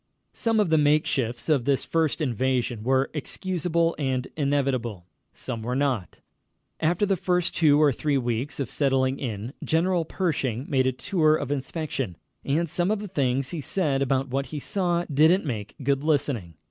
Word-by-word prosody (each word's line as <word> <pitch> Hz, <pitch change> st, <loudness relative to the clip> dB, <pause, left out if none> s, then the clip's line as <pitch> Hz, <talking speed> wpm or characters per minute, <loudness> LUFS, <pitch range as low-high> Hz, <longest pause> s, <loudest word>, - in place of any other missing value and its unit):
Some 225 Hz, -1 st, +1 dB
of 200 Hz, -6 st, +2 dB
the 160 Hz, -, +5 dB
makeshifts 145 Hz, -5 st, +1 dB
of 145 Hz, -7 st, +2 dB
this 140 Hz, -2 st, +1 dB
first 160 Hz, -1 st, 0 dB
invasion 125 Hz, -3 st, 0 dB
were 130 Hz, +3 st, +1 dB
excusable 170 Hz, +1 st, -1 dB
and 130 Hz, -3 st, -1 dB
inevitable. 130 Hz, -, -1 dB, 0.3 s
Some 115 Hz, -3 st, -6 dB
were 125 Hz, +3 st, -2 dB
not. 130 Hz, -, -1 dB, 0.6 s
After 175 Hz, +5 st, +2 dB
the 195 Hz, -1 st, +2 dB
first 180 Hz, -1 st, 0 dB
two 150 Hz, -3 st, +5 dB
or 150 Hz, -2 st, +5 dB
three 145 Hz, +2 st, 0 dB
weeks 120 Hz, +3 st, -2 dB
of 135 Hz, -5 st, -3 dB
settling 135 Hz, -2 st, +1 dB
in, 115 Hz, -1 st, -4 dB
General 170 Hz, +2 st, +1 dB
Pershing 140 Hz, -, -1 dB
made 130 Hz, -3 st, +2 dB
a -, -, +3 dB
tour 155 Hz, +3 st, +2 dB
of 145 Hz, -3 st, -3 dB
inspection, 135 Hz, -, -3 dB, 0.3 s
and 160 Hz, +5 st, 0 dB
some 175 Hz, +4 st, 0 dB
of 215 Hz, -, +2 dB
the 210 Hz, +1 st, -6 dB
things 135 Hz, -5 st, 0 dB
he 165 Hz, -, -4 dB
said 145 Hz, -2 st, 0 dB
about 135 Hz, 0 st, +1 dB
what 135 Hz, +2 st, -1 dB
he 150 Hz, -, -5 dB
saw 175 Hz, +1 st, 0 dB
didn't 160 Hz, +6 st, +3 dB
make 110 Hz, -7 st, -4 dB
good 140 Hz, +1 st, +1 dB
listening. 135 Hz, -, 0 dB
140 Hz, 170 wpm, -25 LUFS, 130-160 Hz, 0.6 s, the